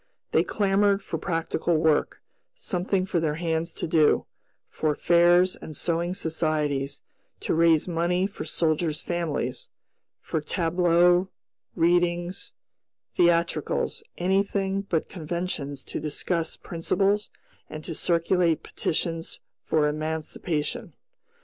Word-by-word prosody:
They -, -, +4 dB
clamored 200 Hz, 0 st, +2 dB
for 165 Hz, -, -4 dB
practical 165 Hz, -1 st, 0 dB
work, 155 Hz, -1 st, +1 dB, 0.3 s
something 185 Hz, -, -1 dB
for 180 Hz, -2 st, 0 dB
their 155 Hz, -2 st, 0 dB
hands 165 Hz, 0 st, -1 dB
to -, -, -3 dB
do; 155 Hz, -2 st, +3 dB, 0.4 s
for 155 Hz, -2 st, -1 dB
fairs 175 Hz, +2 st, +4 dB
and 155 Hz, -, -9 dB
sewing 170 Hz, +3 st, -1 dB
societies 150 Hz, -5 st, -1 dB, 0.4 s
to -, -, 0 dB
raise 165 Hz, -1 st, +4 dB
money 175 Hz, +2 st, +1 dB
for 200 Hz, -, -5 dB
soldier's 155 Hz, -1 st, 0 dB
families, 155 Hz, -7 st, -3 dB, 0.5 s
for 160 Hz, -, -3 dB
tableaux, 175 Hz, +2 st, +3 dB, 0.5 s
readings, 175 Hz, +1 st, +1 dB, 0.6 s
theatricals 170 Hz, -3 st, +1 dB, 0.2 s
anything 195 Hz, +1 st, +1 dB
but 165 Hz, -3 st, 0 dB
conventions 160 Hz, -5 st, -4 dB
to -, -, -5 dB
discuss 160 Hz, +2 st, -2 dB
principles 195 Hz, +5 st, 0 dB, 0.4 s
and 155 Hz, 0 st, -7 dB
to 165 Hz, -, -4 dB
circulate 170 Hz, 0 st, +1 dB
petitions 165 Hz, 0 st, -2 dB, 0.2 s
for 155 Hz, -2 st, +2 dB
emancipation. 155 Hz, +1 st, -3 dB
170 Hz, 105 wpm, -26 LUFS, 155-180 Hz, 0.6 s, They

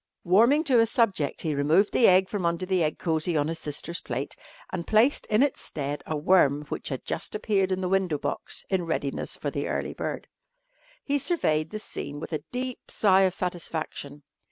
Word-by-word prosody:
Warming 230 Hz, -, +4 dB
to 260 Hz, -7 st, +4 dB
his 230 Hz, -1 st, +4 dB
subject 200 Hz, -, 0 dB
he 155 Hz, -3 st, 0 dB
removed 155 Hz, +8 st, +3 dB
the 240 Hz, -, +5 dB
egg 185 Hz, +1 st, +5 dB
from 200 Hz, -2 st, -3 dB
under 170 Hz, +1 st, 0 dB
the 185 Hz, -2 st, +1 dB
egg 155 Hz, -1 st, -1 dB
cosy 160 Hz, 0 st, 0 dB
on 145 Hz, 0 st, +1 dB
his 165 Hz, 0 st, -4 dB
sister's 150 Hz, +3 st, -4 dB
plate 130 Hz, +3 st, -4 dB, 0.4 s
and 170 Hz, -2 st, -4 dB
placed 225 Hz, +6 st, +3 dB
in 215 Hz, +5 st, +4 dB
its 285 Hz, -, 0 dB
stead 145 Hz, 0 st, -4 dB
a 155 Hz, -, -1 dB
worm 150 Hz, -3 st, +3 dB
which -, -, -4 dB
had 130 Hz, -3 st, -5 dB
just -, -, -3 dB
appeared 200 Hz, -3 st, +1 dB
in 185 Hz, 0 st, 0 dB
the 185 Hz, -, -1 dB
window 185 Hz, -4 st, +1 dB
box -, -, -4 dB
in 180 Hz, -3 st, 0 dB
readiness 140 Hz, -4 st, -2 dB
for -, -, -3 dB
the -, -, -3 dB
early -, -, -2 dB
bird. -, -, -4 dB, 0.8 s
He 285 Hz, 0 st, 0 dB
surveyed 160 Hz, -, 0 dB
the 215 Hz, -, -5 dB
scene 145 Hz, -8 st, -6 dB
with 160 Hz, -, -7 dB
a 150 Hz, -2 st, -2 dB
deep 255 Hz, 0 st, -5 dB
sigh 195 Hz, -2 st, +4 dB
of 190 Hz, -1 st, +2 dB
satisfaction. 160 Hz, -5 st, -4 dB
180 Hz, 200 wpm, -27 LUFS, 155-210 Hz, 0.8 s, the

